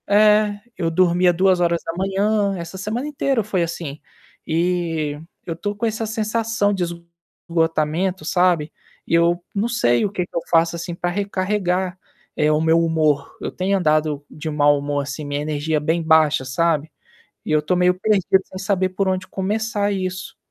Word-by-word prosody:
É, 210 0 +4 0.2
eu 165 - 0
dormia 180 +1 +3
2h, 190 +3 +1
essa 170 +2 -7
semana 220 +8 -3
inteira 275 -5 0
foi 190 -4 0
assim. 165 -3 -5 0.5
E, 165 -3 -1 0.3
eu 165 - -4
tô 205 +5 -4
com 230 - -2
essa 225 0 -1
sensação 220 -1 0
de 190 -2 -1 0.7
esgotamento, 165 +2 0
sabe, 175 -3 +2 0.4
E - - -3
eu 170 +1 +2
não 205 +3 0
sei 120 - +2
o 200 - -2
que 180 -3 -2
que - - -20
eu 170 - 0
faço, 165 0 +3
assim, 170 +1 -5
pra 175 0 -2
recarregar, 190 -1 -1 0.4
eh, 150 0 +2
o 155 0 +2
meu 160 +1 +4
humor. 155 -4 +1
Eu - - -3
tenho 195 +2 0
andado 155 -4 +1
de 155 +1 -8
um 155 - -2
mau 145 -1 +4
humor 145 0 -2
assim, 145 +2 -6
minha 145 0 -2
energia 150 +1 -1
bem 160 +3 0
baixa, 160 -4 +4
sabe, 155 +2 0 0.5
e - - -3
eu 155 0 +3
tô 155 +5 0
meio 180 0 +4
perdido, 195 -2 +3
sem 185 - -10
saber 190 -1 0
por 190 +1 -1
onde 185 -1 -1
começar 205 +1 -1
isso. 185 -2 -4
175 Hz, 170 wpm, -21 LUFS, 160-200 Hz, 0.7 s, É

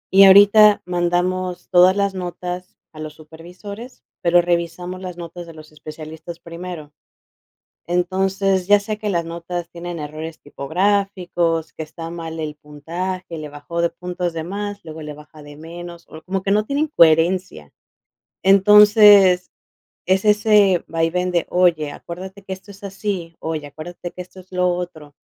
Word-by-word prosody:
Y 195 - +9
ahorita 205 +2 +7
mandamos 180 +1 -1
todas 185 +1 +6
las 200 -1 +1
notas 180 0 -6
a 155 - -13
los 155 0 -7
supervisores, 180 +9 -11 0.2
pero 175 0 +4
revisamos 175 +1 -2
las 180 -2 -7
notas 170 0 -8
de 165 - -12
los 155 -1 -13
especialistas 155 +2 -10
primero. 170 -3 -9 0.9
Entonces, 190 +2 0
ya 205 +1 +5
sea 210 +1 -4
que 210 -1 -3
las 170 -2 -1
notas 170 +1 -6
tienen 175 0 -7
errores 155 +2 -7
tipográficos, 175 +1 -1
que 160 - -6
está 165 +1 -9
mal 165 -1 -7
el 150 -1 -4
puntaje, 165 +4 -6
le 155 - -6
bajó 160 +4 -4
de 170 - +1
puntos 180 0 -4
de 165 -1 -4
más, 200 +3 -5
luego 160 -1 -9
le 150 0 -7
baja 150 +1 -15
de 145 0 -12
menos, 170 +2 -10
o 155 0 -12
como 190 +1 -3
que 195 - -3
no 210 +2 +2
tienen 290 +4 0
coherencia. 165 - +3 0.7
Entonces, 200 -1 +6 0.5
es 190 +3 +1
ese 210 -4 +4
vaivén 165 +2 0
de, 170 -2 0
"Oye, 170 -5 +2
acuérdate 190 +6 -9
que 190 - -7
esto 190 +2 -9
es 200 0 -13
así, 195 -4 -4
oye, 155 -2 -4
acuérdate 165 +4 -8
que - - -10
esto 185 +1 -10
es 185 +1 -20
lo 180 0 +1
otro". 160 -5 -7
175 Hz, 155 wpm, -20 LUFS, 165-190 Hz, 0.9 s, Y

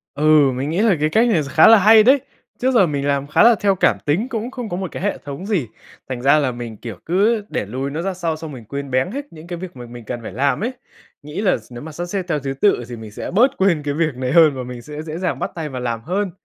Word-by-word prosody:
Ừ, 150 -1 +4
mình 130 +3 -3
nghĩ 170 +6 0
là 220 -4 +4
cái 155 +1 +1
cách 225 +8 +3
này 185 -9 +2
kh 140 - -5
khá - - +6
là 225 - +9
hay 215 +2 +7
đấy, 265 +4 +5 0.4
trước 260 +1 +1
giờ 230 -6 +5
mình 145 -2 -2
làm 140 0 0
khá 150 - +4
là 235 0 +7
theo 200 -2 +1
cảm 120 - +2
tính 175 +12 +1
cũng 235 0 -4
không 245 -4 -6
có 175 - -3
một 190 -1 -4
cái - - -6
hệ 205 - 0
thống 145 +6 -8
gì, 190 - -1 0.4
thành 125 -2 -4
ra 140 +4 +5
là 135 -4 0
mình, 120 -2 -7
kiểu, 115 -2 -7
cứ 205 +6 +2
để - - -2
lùi 130 +7 -4
nó 155 +3 -3
ra 190 +2 -2
sau 170 -3 -2
xong 160 -1 -8
mình 125 -5 -10
quên 140 +4 -6
béng 130 +7 +1
hết 280 +4 -5
những 160 +1 -12
cái 175 -1 -5
việc 180 -2 -8
mà 120 - -8
mình 120 -1 -11
cần 120 +2 -5
phải - - -7
làm 140 - 0
ấy, 245 - -1 0.5
nghĩ 150 +6 -5
là 200 -4 +2
s 115 +1 -18
nếu 120 0 -8
mà 160 - -8
sắp 175 +4 -5
xếp 190 +2 -3
theo 155 -4 0
thứ 135 -1 -4
tự 200 -11 +3
thì 120 - -6
mình 110 -2 -10
sẽ - - -6
bớt 240 +8 +3
quên 180 -6 +2
cái 145 -1 -2
việc 155 -2 0
này 130 0 -3
hơn 160 -2 +6
và 130 - -4
mình 125 -1 -8
sẽ 150 +4 -8
dễ 155 0 -6
dàng 180 0 -2
bắt - - -3
tay 160 -3 -4
vào 130 -2 -6
làm 115 -2 -3
hơn. 185 - -2
155 Hz, 305 wpm, -20 LUFS, 130-195 Hz, 0.5 s, là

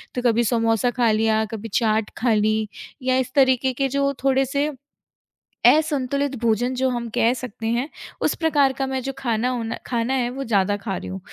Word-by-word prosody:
तो 250 - -1
कभी 240 -1 +2
समोसा 230 +1 +1
खा 235 -2 +2
लिया, 220 0 +2
कभी 225 +1 -6
चाट 220 -2 +1
खा 235 -1 +2
ली 215 0 +1 0.4
या 255 0 +2
इस 255 -1 -2
तरीके 260 -1 +3
के 270 +2 0
जो 280 +1 0
थोड़े-से, 270 +2 +1 0.9
असंतुलित 280 -2 +2
भोजन 235 +2 +1
जो 260 +1 +1
हम 240 -2 -3
कह 235 +2 +3
सकते 235 -3 -6
हैं, 240 +5 0 0.3
उस - - +2
प्रकार 290 -5 +2
का 270 - 0
मैं 265 0 -2
जो 270 - -3
खाना 240 -1 0
हो 245 -2 -2
ना 225 - -3
खाना 240 +1 -1
है 245 -2 0
वो 270 +2 -5
ज़्यादा 205 -3 +1
खा 200 -2 -4
रही - - -7
हूँ। 190 +1 -5
245 Hz, 195 wpm, -22 LUFS, 225-265 Hz, 0.9 s, तरीके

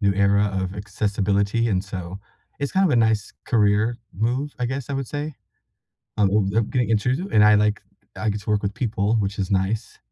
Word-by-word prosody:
new 100 -2 +3
era 100 +1 +3
of 95 +1 -3
accessibility, 100 +2 0
and 95 -3 +1
so 95 -1 -6 0.4
it's 140 -1 -3
kind 190 +1 +3
of - - +1
a - - +3
nice 110 -2 +2
career 110 +1 +2 0.2
move, 125 +7 -1
I 125 - 0
guess, 130 +1 -4
I - - -1
would 135 -2 -2
say. 145 0 -4 0.8
I'm, 100 -3 +3
uh, 100 +1 +2
uh, - - +5
getting 120 +1 -1
introduced 125 +7 +1
to - - -7
it - - -8
and 105 - +6
I 105 0 +7
like 105 0 +1 0.3
I 110 - -2
get 105 0 -3
to 105 - -4
work 105 -1 +1
with 100 0 -1
people, 110 -2 0
which 100 -2 -1
is 95 - -2
nice 100 +3 -1
105 Hz, 220 wpm, -23 LUFS, 100-120 Hz, 0.8 s, I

